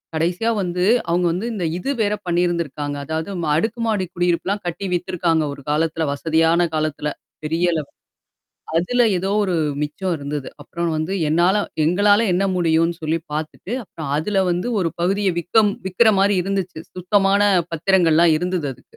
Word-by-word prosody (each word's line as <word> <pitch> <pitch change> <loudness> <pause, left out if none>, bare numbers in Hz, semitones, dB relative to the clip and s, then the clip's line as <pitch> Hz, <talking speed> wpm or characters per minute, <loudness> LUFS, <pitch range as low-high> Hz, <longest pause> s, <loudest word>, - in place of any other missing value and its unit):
கடைசியா 175 +8 0
வந்து 180 -1 -1 0.3
அவுங்க 175 +1 +2
வந்து, 185 +6 -3
இந்த 185 -5 -2
இது 270 +10 -2
வேற 205 0 +1
பண்ணியிருந்திருக்காங்க. 170 -5 -1
அதாவது 160 +4 -3 0.3
அடுக்குமாடி 220 +1 0
குடியிருப்புலாம் 180 +3 0
கட்டி 195 +3 -4
வித்திருக்காங்க 170 -2 0
ஒரு 140 - -11
காலத்தில. 160 +1 0
வசதியான 165 +3 +2
காலத்துல 155 -1 -1 0.3
பெரிய 170 +3 +1
அளவு. 150 -3 -3 0.9
அதுல 245 +9 +2
ஏதோ 190 +2 -2
ஒரு 185 -2 -1 0.3
மிச்சம் 175 +5 -2
இருந்தது. 145 -1 -5
அப்புறம் 170 +3 -3
வந்து 155 +4 -2 0.2
என்னால 175 +5 +3 0.3
எங்களால 205 +6 +4
என்ன 195 +2 +1
முடியும்ன்னு 165 -1 +2
சொல்லி 160 +1 0
பார்த்துட்டு, 155 +7 -5
அப்புறம் 160 -6 -8
அதுல 195 +6 0
வந்து 180 +7 -1
ஒரு 170 - +1
பகுதிய 195 +2 +1
விக்க 180 +7 +3 0.2
விக்கிறமாரி 200 0 +3
இருந்துச்சு. 190 -3 -3 0.2
சுத்தமான 195 +2 +2 0.3
பத்திரங்கள்லாம் 170 -1 +3
இருந்தது 180 -3 -2
அதுக்கு. 125 - -21
175 Hz, 140 wpm, -21 LUFS, 160-195 Hz, 0.9 s, எங்களால